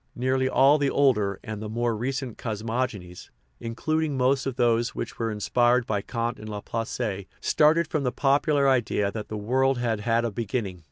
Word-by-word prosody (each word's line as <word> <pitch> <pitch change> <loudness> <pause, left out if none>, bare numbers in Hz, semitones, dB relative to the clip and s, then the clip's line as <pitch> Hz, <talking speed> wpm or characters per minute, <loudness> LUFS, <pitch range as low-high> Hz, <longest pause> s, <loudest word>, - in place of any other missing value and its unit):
Nearly 130 +1 +1
all 140 +3 +5
the 140 -1 +2
older 105 -10 +2
and 110 -2 -6
the 110 - -5
more 120 +1 -1
recent 130 +1 -3
cosmogo 115 +2 -2
nies, 90 0 -12 0.3
including 150 +5 -2
most 130 +1 +2
of 135 - -3
those 120 +1 +1
which - - -6
were 115 -1 0
inspired 120 +3 +2
by 105 -3 -1
Kant 115 +2 -3
and 110 - -8
Laplace, 105 -1 -4
started 160 +3 +3
from 155 - -1
the 125 -2 0
popular 140 +1 +2
idea 115 -6 +1
that 105 0 -6
the 110 - -5
world 130 +5 +1
had 115 -3 -1
had 115 +2 +1
a 115 - -2
beginning. 100 -3 -3
120 Hz, 180 wpm, -26 LUFS, 110-130 Hz, 0.3 s, all